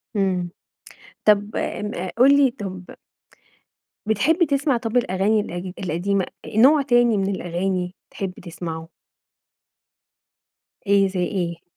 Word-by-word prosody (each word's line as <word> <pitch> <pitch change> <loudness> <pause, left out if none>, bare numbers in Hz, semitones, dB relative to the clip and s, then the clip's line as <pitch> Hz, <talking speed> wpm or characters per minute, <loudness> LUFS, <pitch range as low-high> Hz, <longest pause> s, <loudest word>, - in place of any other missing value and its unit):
إمم. 185 -3 0 0.8
طب 210 0 +3
م 210 -3 -3
قُل 275 +3 +6
لي 275 -3 +4
طب 190 -5 -8 1.1
بتحب 280 - +2
تسمع 280 -2 +1
طب 230 0 -2
الأغاني 205 0 +2
القد 180 -1 -6
القديمة، 185 +3 0 0.3
نوع 280 +6 +6
تاني 240 -4 +3
من 195 0 0
الأغاني 180 +1 -2 0.2
تحب 190 -2 -4
تسمعه؟ 165 -1 -6 2.0
إيه، 200 -1 +4
زي 185 -1 -4
إيه؟ 170 -3 -3
195 Hz, 105 wpm, -22 LUFS, 180-235 Hz, 2.0 s, قُل